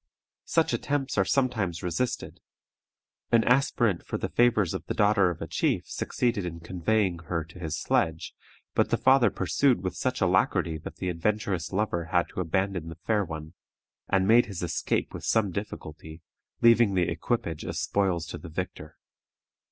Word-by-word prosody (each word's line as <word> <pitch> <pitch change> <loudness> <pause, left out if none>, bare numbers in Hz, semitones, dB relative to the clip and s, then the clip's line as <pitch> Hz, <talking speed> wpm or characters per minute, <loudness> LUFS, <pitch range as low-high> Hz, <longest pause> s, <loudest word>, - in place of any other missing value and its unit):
Such - - +2
attempts 145 -2 -1
are - - +5
sometimes 110 -11 0
resisted. 90 +8 -2 0.9
An 115 -1 +5
aspirant 120 -6 +2
for - - -4
the - - -3
favors 115 -7 +3
of - - -4
the - - -2
daughter 100 -3 +4
of 85 - -5
a - - -6
chief - - 0
succeeded 120 -5 -1
in 85 -1 -5
conveying 90 +2 0
her 80 0 -3
to 85 +2 -14
his 80 -3 -3
sledge, 80 0 0 0.4
but - - +2
the - - +2
father 130 -3 +5
pursued 100 +4 +1
with 95 - -3
such 130 0 -1
alacrity 90 -3 +1
that 80 0 -9
the 90 +1 -3
adventurous 90 0 -1
lover 95 -4 -1
had 85 +1 +1
to - - -7
abandon 90 0 -1
the 80 - -8
fair 105 -2 +2
one, 80 -2 -7 0.6
and 95 -1 +2
made 115 +3 +6
his 95 -4 -5
escape 85 - -1
with - - -7
some 110 -4 +2
difficulty, 80 -4 -7 0.4
leaving 115 -4 +5
the 90 -2 +2
equipage 85 -1 -2
as - - -4
spoils 95 -5 0
to 85 - -7
the 80 +2 -9
victor. 90 +3 -6
95 Hz, 165 wpm, -27 LUFS, 85-110 Hz, 0.9 s, made